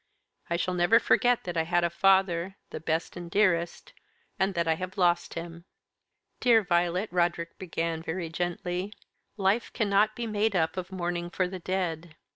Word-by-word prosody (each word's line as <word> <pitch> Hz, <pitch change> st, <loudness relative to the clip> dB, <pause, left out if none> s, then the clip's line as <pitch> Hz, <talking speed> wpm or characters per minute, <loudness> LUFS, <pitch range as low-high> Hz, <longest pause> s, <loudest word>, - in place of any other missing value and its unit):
I 170 Hz, -, +1 dB
shall 180 Hz, +1 st, -1 dB
never 180 Hz, +6 st, +4 dB
forget 245 Hz, 0 st, +3 dB
that 175 Hz, -1 st, -5 dB
I 165 Hz, -, +2 dB
had 175 Hz, +2 st, +1 dB
a 170 Hz, -, +1 dB
father 190 Hz, 0 st, +2 dB, 0.2 s
the -, -, -5 dB
best 160 Hz, +1 st, -2 dB
and 175 Hz, -1 st, -7 dB
dearest 175 Hz, -3 st, +1 dB, 0.5 s
and 190 Hz, 0 st, +1 dB
that 170 Hz, -1 st, 0 dB
I 160 Hz, -, +4 dB
have 185 Hz, +4 st, -6 dB
lost 175 Hz, -2 st, +2 dB
him." 170 Hz, 0 st, -7 dB, 0.7 s
"Dear 235 Hz, -3 st, +5 dB
Violet," 175 Hz, +2 st, +1 dB
Roderick 170 Hz, -1 st, 0 dB
began, 165 Hz, -2 st, -3 dB
very 165 Hz, +1 st, -4 dB
gently, 175 Hz, +3 st, -3 dB, 0.4 s
"life 200 Hz, +4 st, +1 dB
cannot 210 Hz, 0 st, +2 dB
be 240 Hz, -, -3 dB
made 215 Hz, -1 st, 0 dB
up 160 Hz, -2 st, +1 dB
of 185 Hz, 0 st, -5 dB
mourning 175 Hz, -1 st, -3 dB
for 185 Hz, 0 st, 0 dB
the 185 Hz, 0 st, -6 dB
dead. 170 Hz, -3 st, -3 dB
175 Hz, 170 wpm, -28 LUFS, 170-195 Hz, 0.7 s, Dear